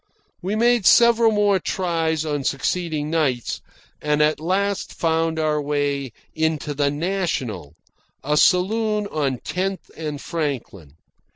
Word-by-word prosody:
We 195 +4 -2
made 235 -2 +3
several 235 -1 +6
more 205 -2 +3
tries 165 -4 -1
on 145 -2 -2
succeeding 155 +2 -1
nights, 140 -7 0 0.4
and 150 0 +1
at 150 0 +2
last 195 +4 -1
found 165 0 0
our 155 -1 +1
way 145 -2 -1 0.2
into 160 -2 -1
the 140 0 +1
National, 145 - -3 0.5
a 150 +2 0
saloon 210 +5 +2
on 140 -4 -1
Tenth 190 +1 -3
and 150 -3 -5
Franklin. 130 - -4
160 Hz, 120 wpm, -22 LUFS, 145-190 Hz, 0.5 s, several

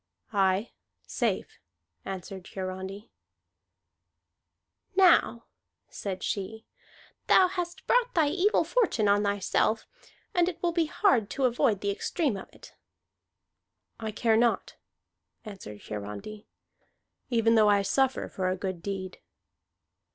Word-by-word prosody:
"Aye, 195 +2 +2 0.3
safe," - - -2 0.5
answered 190 -1 -7
Hiarandi. 190 +2 -6 1.8
"Now," 355 -10 +4 0.4
said 190 -2 -5
she, 220 +3 -4 0.6
"thou 370 - +6
hast 360 0 -5
brought - - +2
thy 315 -4 +4
evil 385 +7 +2
fortune 370 - +1
on 200 0 +4
thyself, 205 +2 +1 0.5
and 350 0 +3
it 350 - -7
will 345 - +2
be 335 -2 +1
hard 260 - +2
to 270 - 0
avoid 235 -4 +2
the 200 - 0
extreme 275 - -1
of 195 - -8
it." - - -15 1.3
"I 220 -1 -4
care 220 +1 +1
not," 235 0 +1 0.7
answered 185 - -9
Hiarandi, 105 - -7 0.8
"even 230 -2 +3
though 215 -2 +5
I 200 -1 +4
suffer 265 +6 +1
for 185 -1 -2
a 185 - 0
good 185 -2 -4
deed." 190 -1 -5
215 Hz, 115 wpm, -28 LUFS, 195-290 Hz, 1.8 s, thou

